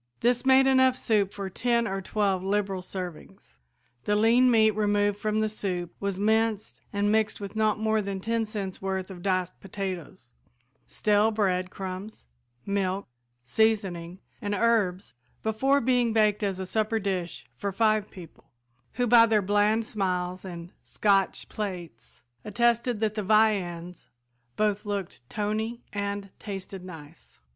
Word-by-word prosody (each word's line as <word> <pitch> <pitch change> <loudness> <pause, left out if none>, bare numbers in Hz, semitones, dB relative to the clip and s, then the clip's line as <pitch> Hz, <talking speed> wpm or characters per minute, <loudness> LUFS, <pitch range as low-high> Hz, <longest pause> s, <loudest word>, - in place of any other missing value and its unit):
This 245 +2 +2
made 265 0 +6
enough 260 -1 +4
soup 205 -5 +1
for 200 -2 -5
ten 235 +4 0
or 195 0 -3
twelve 195 -1 0
liberal 195 -1 -1
servings. 180 -2 -8 0.5
The 210 - +2
lean 235 +4 +5
meat 220 -2 +5
removed 205 -1 +1
from 215 0 0
the 215 - +2
soup 185 -5 -4
was 200 -2 -2
minced 220 0 0
and 205 0 +1
mixed 220 0 +1
with 200 0 -7
not 215 -1 +2
more 220 0 +1
than 195 -1 -4
ten 230 +3 -1
cents' 200 -3 -5
worth 190 0 -3
of 180 -2 -9
diced 185 -1 -1
potatoes, 185 - -6 0.5
stale 210 +1 +2
bread 185 -4 0
crumbs, 190 +3 -7 0.4
milk, 200 -1 -1 0.4
seasoning 185 - 0 0.2
and 205 0 -1
herbs 200 - +1 0.3
before 265 +6 +2
being 245 -2 +2
baked 215 -1 +3
as 195 -2 -1
a 190 - -3
supper 215 +3 0
dish 190 -5 -3
for 200 +10 -3
five 215 +1 +2
people, 175 -4 -13 0.4
who 245 +1 0
by 230 -1 +7
their 220 -1 +3
bland 205 +3 +2
smiles 185 -3 -2
and 175 -2 -8
"scotch 195 -2 +1
plates" 175 - -7 0.2
attested 235 +1 +1
that 215 -1 +1
the 215 - -2
viands 185 -5 +1 0.5
both 210 -1 +1
looked 200 - -4
"tony" 220 +3 -2
and 200 -1 -3
tasted 195 -2 -7
nice. 165 -3 -12
205 Hz, 145 wpm, -27 LUFS, 190-220 Hz, 0.5 s, by